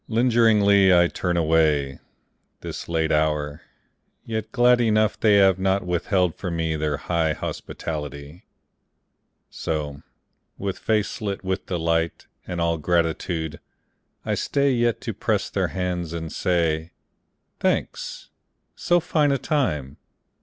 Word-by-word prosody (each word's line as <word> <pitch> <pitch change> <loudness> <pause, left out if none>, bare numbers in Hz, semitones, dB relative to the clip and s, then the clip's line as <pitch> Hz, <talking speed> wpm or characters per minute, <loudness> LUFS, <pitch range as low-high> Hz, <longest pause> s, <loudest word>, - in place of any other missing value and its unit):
Lingeringly 110 -5 +4
I 85 -1 +6
turn 90 -2 -2
away, 75 -4 +2 0.6
This - - -7
late 80 -1 0
hour, 75 -1 0 0.6
yet 110 -1 -4
glad 120 0 +4
enough 110 -2 +2
They 105 -2 +4
have 95 -2 +5
not 95 0 +1
withheld 90 0 +1
from 90 -3 -5
me 80 -1 -1
Their 75 -1 -1
high 80 0 0
hospitality. 75 +1 -6 1.1
So, 75 -3 -4 0.6
with 100 -1 -4
face 110 0 -1
lit 100 -2 -3
with 95 0 -3
delight 85 -2 -1 0.2
And 90 -1 -4
all 85 -1 0
gratitude, 80 0 -1 0.7
I - - 0
stay 140 0 +1
Yet 120 -2 +1
to - - -4
press - - -1
their - - 0
hands 90 -3 -3
and 80 -1 -5
say, 85 -2 0 0.7
"Thanks. - - -2 0.4
So 175 0 +2
fine 150 -3 +1
a 140 - +2
time 75 - -1
85 Hz, 125 wpm, -24 LUFS, 80-105 Hz, 1.1 s, I